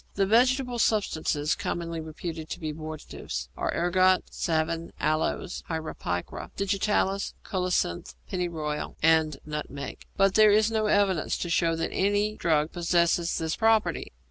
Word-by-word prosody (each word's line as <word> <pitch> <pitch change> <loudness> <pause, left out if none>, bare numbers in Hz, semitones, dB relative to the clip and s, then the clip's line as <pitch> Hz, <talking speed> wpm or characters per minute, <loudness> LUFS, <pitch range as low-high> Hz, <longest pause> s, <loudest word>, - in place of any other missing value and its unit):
The 195 - +2
vegetable 250 +3 +3
substances 160 -9 +1
commonly 170 -1 -3
reputed 160 0 -6
to - - -5
be 155 -3 -3
abortives 155 0 -6
are - - -1
ergot, 185 +2 +3
savin, 165 0 -1
aloes 155 +3 -1
(Hierapicra), 155 - -4
digitalis, 200 0 0
colocynth, 180 - -1
pennyroyal, 160 -4 -3
and 160 -2 +4
nutmeg; 150 -2 -6
but 195 -1 +4
there 215 0 +7
is 215 +2 +4
no 220 -1 +1
evidence 195 -6 +2
to 175 - -3
show 165 -1 +2
that 165 - -2
any 205 +2 +1
drug 155 -4 +1
possesses 170 -1 +1
this 160 -1 -1
property. 225 -1 +2
170 Hz, 130 wpm, -27 LUFS, 155-200 Hz, -, there